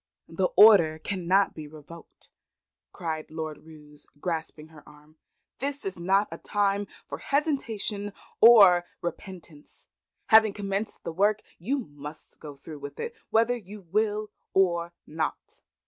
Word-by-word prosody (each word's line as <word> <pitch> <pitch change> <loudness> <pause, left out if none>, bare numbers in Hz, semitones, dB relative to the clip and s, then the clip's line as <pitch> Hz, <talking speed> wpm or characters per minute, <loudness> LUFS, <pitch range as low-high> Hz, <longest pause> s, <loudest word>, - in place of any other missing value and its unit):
"The - - 0
order 175 -8 +7
cannot 190 +3 +1
be 155 -2 -8
revoked," 155 +2 -14 0.6
cried 160 -4 -5
Lord 155 -1 -6
Roos, 150 -2 -15
grasping 160 -2 -4
her 155 -2 -15
arm. 150 +1 -20 0.4
"This 280 +1 -4
is 190 -2 -4
not 195 +4 +2
a - - -7
time 200 0 0 0.2
for - - -6
hesitation 230 -8 -2 0.3
or 200 -7 +8 0.2
repentance. 175 -3 -9 0.4
Having 220 -2 +6
commenced 200 +1 -4
the 165 - -5
work, 205 +4 +2 0.2
you 245 +12 -1
must 150 - -10
go 150 -2 -9
through 150 +2 -11
with 145 0 -9
it 470 - -4 0.2
whether 230 +2 +3
you 210 -2 -10
will 210 0 0 0.2
or 170 -3 +2
not." 155 +1 -5
185 Hz, 130 wpm, -27 LUFS, 155-210 Hz, 0.6 s, or